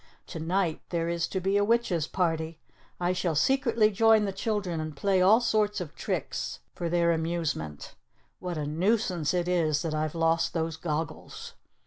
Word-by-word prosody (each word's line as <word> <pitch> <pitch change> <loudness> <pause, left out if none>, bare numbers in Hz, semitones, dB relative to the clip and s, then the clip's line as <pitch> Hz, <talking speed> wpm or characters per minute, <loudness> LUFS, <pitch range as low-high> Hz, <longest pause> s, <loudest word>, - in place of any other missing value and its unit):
To 165 - -7
night 170 0 0
there 170 -1 -1
is 170 0 -1
to 190 - -2
be 195 +2 +1
a 205 - +3
witch's 205 -8 +1
party. 165 -2 -1 0.4
I 175 +1 +1
shall 175 -3 -1
secretly 235 - +3
join 220 +1 +4
the 200 - -1
children, 195 -4 -2
and 155 -2 -5
play 190 +2 +2
all 205 +5 +6
sorts 215 -3 +1
of 170 -5 -6
tricks - - -3 0.2
for 170 - -3
their 170 0 +3
amusement. 160 - -2 0.5
What 180 -2 -4
a 150 - -2
nuisance 175 0 +1
it 175 -1 0
is 165 -4 +1
that 165 -2 -2
I've 155 +1 -2
lost 165 0 +1
those 160 -1 -1
goggles." 160 -1 -5
170 Hz, 170 wpm, -28 LUFS, 160-195 Hz, 0.5 s, all